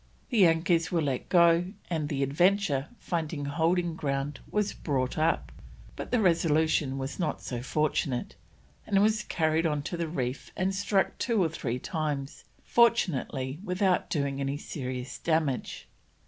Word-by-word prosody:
The 210 -7 +6
anchors 165 0 +2
were 175 - +2
let 135 -3 -2
go, 170 -1 +5 0.2
and 155 -4 -2
the 140 -1 0
Adventure, 155 0 +2
finding 160 -6 -3
holding 170 +4 +1
ground, 140 -2 -2
was 210 -1 0
brought 130 -4 -1
up; 160 +2 +1 0.4
but - - -6
the 245 - +2
Resolution 160 -6 +2
was 135 +5 -5
not 155 -5 -1
so 120 -2 -4
fortunate, 140 -2 -1 0.5
and 200 -2 +3
was 215 +1 +3
carried 160 0 +1
on 150 -2 -1
to 175 - -4
the 170 -1 -2
reef 130 -4 -3
and 190 +1 0
struck 195 0 0
two 230 -6 +2
or 165 - +1
three 125 -6 -3
times, 145 -1 -3 0.2
fortunately 150 - +2
without 185 -1 +1
doing 140 -3 -1
any 140 +1 -1
serious 125 -4 -5
damage. 155 -2 -1
160 Hz, 145 wpm, -28 LUFS, 140-180 Hz, 0.5 s, The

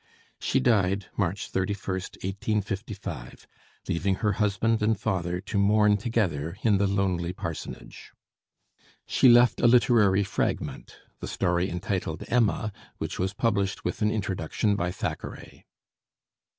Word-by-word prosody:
She 135 - +1
died 100 -6 +2
March 95 0 -2
31st, 95 -1 -3
1855, 100 - -4 0.4
leaving 95 +3 0
her 105 +2 0
husband 105 +2 +1
and 105 -1 +2
father 90 -5 -1
to 100 +1 -2
mourn 105 +1 +4
together 95 -8 -1
in 105 -4 +3
the 100 - +3
lonely 95 -3 0
parsonage. 85 -3 -7 0.9
She 130 - +4
left 120 +1 +5
a - - +5
literary 115 -5 +5
fragment 100 0 -3 0.2
the - - -6
story 90 +1 0
entitled 90 -2 -3
'Emma,' 110 -2 +1 0.3
which - - -5
was 95 +2 -1
published 100 -4 0
with - - -3
an 105 - +3
introduction 100 -1 -1
by 90 -3 -1
Thackeray. - - -6
100 Hz, 125 wpm, -27 LUFS, 95-110 Hz, 0.9 s, left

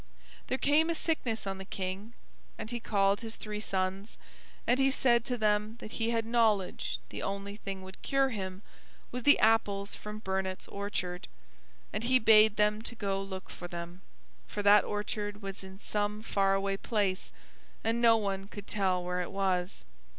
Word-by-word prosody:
There 260 - 0
came 300 +4 +3
a 335 - +1
sickness 255 -10 -1
on 195 -1 -3
the - - -5
King, 195 +3 -5 0.4
and 220 - -5
he 240 - -2
called 200 -2 +2
his 225 -1 -6
three 210 -1 -5
sons, 190 0 -2 0.5
and 245 +2 +3
he 270 0 +5
said 240 -3 +3
to 250 -2 -1
them 210 0 +1
that 215 - -8
he 225 0 -1
had 230 -1 0
knowledge 215 - +1
the - - -6
only 200 +1 -4
thing 195 -3 -6
would 190 0 -11
cure 275 -1 +2
him 190 -4 -5 0.5
was 250 - -3
the 290 +4 +6
apples 205 -3 +2
from 210 0 -7
Burnett's 190 -2 -2
orchard, 185 -3 -3 0.7
and - - -2
he 255 +1 +5
bade 220 -2 +6
them 210 0 +2
to 235 - -5
go 195 -3 -1
look 190 -1 -7
for 175 - -7
them, 175 +1 -7 0.5
for 205 - -4
that 205 0 +7
orchard 205 0 -3
was 195 0 -6
in 190 0 -10
some 210 +1 -2
far 195 -3 +2
away 195 0 0
place, 200 -3 -1 0.5
and 230 +1 +1
no 230 -1 +7
one 195 -2 -2
could 205 -1 -9
tell 190 -4 0
where 180 0 -1
it 175 - -4
was. 185 - -1
205 Hz, 180 wpm, -31 LUFS, 195-225 Hz, 0.7 s, that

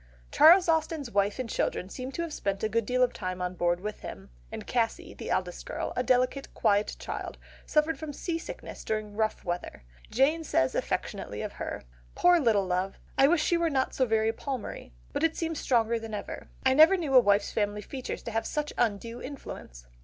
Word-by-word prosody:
Charles 355 +3 +7
Austen's 320 -5 0
wife 200 0 +1
and 255 -2 -3
children 185 - -1
seem 255 +6 -6
to 335 - -2
have 330 -3 -5
spent 200 -4 -2
a 220 - +1
good 230 0 0
deal 255 0 +3
of 250 - +2
time 185 -1 -4
on 180 0 -2
board 175 0 +1
with 210 +3 -5
him; 95 -8 -9 0.2
and - - -6
Cassy, - - -1
the - - -7
eldest - - -1
girl, - - -4
a - - +1
delicate 255 +2 +1
quiet 205 +1 +2
child, - - -5 0.3
suffered 305 +1 +2
from 315 -2 -5
seasickness 330 +3 -5
during 215 -1 -3
rough 215 0 -1
weather. 175 - -4 0.3
Jane 290 +7 +2
says 130 - +1
affectionately - - -3
of - - -4
her, - - -5 0.3
"Poor 355 -1 +5
little 220 -8 +3
love! 185 +1 -1 0.2
I 270 - +6
wish 315 0 +3
she 345 - +2
were 335 -1 +1
not 265 -3 0
so 260 - +1
very 220 0 +2
Palmery, 255 - -5 0.2
but - - -1
it 325 0 +2
seems 325 -2 -2
stronger 230 -2 +2
than 225 -1 -6
ever. 205 - -7 0.2
I 260 - +5
never 315 +7 +7
knew 310 -6 -2
a 255 - +10
wife's 205 -3 +3
family 210 -1 -1
features 260 -3 -6
have 225 0 -1
such 300 0 -2
undue 230 +1 -1
influence." - - -8
235 Hz, 200 wpm, -29 LUFS, 205-295 Hz, 0.3 s, a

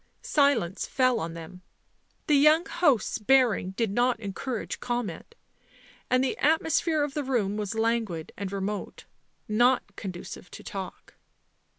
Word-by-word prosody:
Silence 260 - +2
fell 255 -2 +2
on 165 0 -4
them; 170 +2 -10 0.6
the 300 - +2
young 305 +4 +5
host's 300 - +1
bearing 235 -4 +3
did 205 +2 -1
not 240 +2 +2
encourage 220 +3 -4
comment, 240 - -4 0.7
and 255 +1 +3
the 265 - 0
atmosphere 320 +1 +2
of 290 -1 -3
the 295 - -2
room 230 -7 0
was 210 0 -3
languid 220 -7 -1
and 195 -1 -5
remote, 200 +1 -4 0.4
not 240 +4 +2
conducive 185 -1 -7
to - - -11
talk. 190 -2 -7
230 Hz, 130 wpm, -27 LUFS, 195-270 Hz, 0.7 s, young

